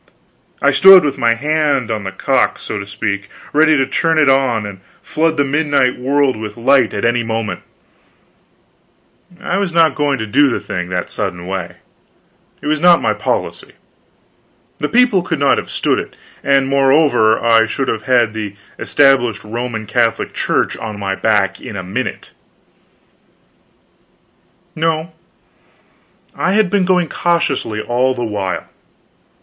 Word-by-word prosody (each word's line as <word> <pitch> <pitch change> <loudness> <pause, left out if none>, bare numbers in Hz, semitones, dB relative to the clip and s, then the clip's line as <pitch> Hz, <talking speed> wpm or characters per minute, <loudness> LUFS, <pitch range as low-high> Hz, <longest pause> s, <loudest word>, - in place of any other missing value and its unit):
I - - +4
stood 190 -3 +7
with 140 - -2
my 115 0 +2
hand 145 -3 0
on 105 -2 -3
the 95 - -4
cock, 95 - 0
so 105 - -6
to 100 - -7
speak, 100 -1 -4 0.2
ready 155 +1 +4
to 135 - +2
turn 165 +4 0
it 150 -3 +4
on 125 -5 +1
and 100 -2 -8 0.2
flood 160 0 -1
the 145 - +3
midnight 145 -3 0
world 140 +1 +1
with 110 -1 -7
light 125 0 +3
at - - -2
any 120 +1 +1
moment. 115 -1 -4 1.7
But 175 0 -18
I 185 - -1
was 195 -3 -2
not 165 -3 +3
going 145 -1 0
to 110 - -4
do 140 +7 +3
the - - -2
thing 90 -1 -5
in - - -13
that 90 -1 -3
sudden 85 0 -4
way. 95 -2 -5 0.9
It - - -8
was 155 +1 0
not 175 +1 +5
my - - 0
policy. - - -4 1.1
The - - -2
people 240 -6 +3
could 165 -2 -3
not 140 0 +2
have - - -8
stood - - 0
it; - - -8 0.3
and, 135 -1 +2
moreover, 135 -5 +3
I 115 -1 +3
should 135 +4 -3
have 110 - -2
had 120 -4 +2
the 105 -2 -6 0.2
Established 135 -6 +2
Roman 115 0 -5
Catholic 115 +1 -1
Church - - -1
on 110 -2 -7
my 100 -1 -3
back 95 -2 0
in 110 - -8
a 95 - -5
minute. 90 - -5 2.4
No, 160 +1 -1 1.2
I 190 - 0
had 210 -3 +2
been 200 -2 +2
going 180 -2 +2
cautiously 170 -11 -1
all 125 +3 0
the 120 - -4
while. 100 -4 -3
130 Hz, 155 wpm, -16 LUFS, 110-155 Hz, 2.4 s, stood